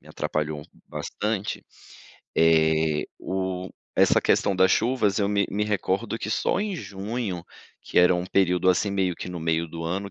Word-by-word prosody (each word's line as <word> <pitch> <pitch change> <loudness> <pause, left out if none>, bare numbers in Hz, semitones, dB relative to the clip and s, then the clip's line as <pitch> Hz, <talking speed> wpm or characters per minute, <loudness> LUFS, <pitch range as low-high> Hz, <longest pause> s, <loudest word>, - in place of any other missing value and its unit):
me - - -18
atrapalhou 75 -1 -3 0.3
bastante, 105 0 -3 0.7
eh, 80 -1 +3
o 95 -1 -3 0.3
essa - - +5
questão 100 - +2
das 95 +1 +5
chuvas, 115 -5 +2
eu 100 -1 +1
me 100 -1 +1
me 105 +1 0
recordo 105 +2 -1
que 110 - -4
só 110 - +1
em 205 -2 -2
junho, 100 - -4 0.4
que - - 0
era 90 0 +6
um 90 0 -1
período, 95 -1 +2
assim, 95 +3 +1
meio 95 -2 0
que - - -6
no 90 -1 -5
meio 80 +1 0
do 85 +1 -6
ano, 100 +4 -3
95 Hz, 165 wpm, -25 LUFS, 85-105 Hz, 0.7 s, era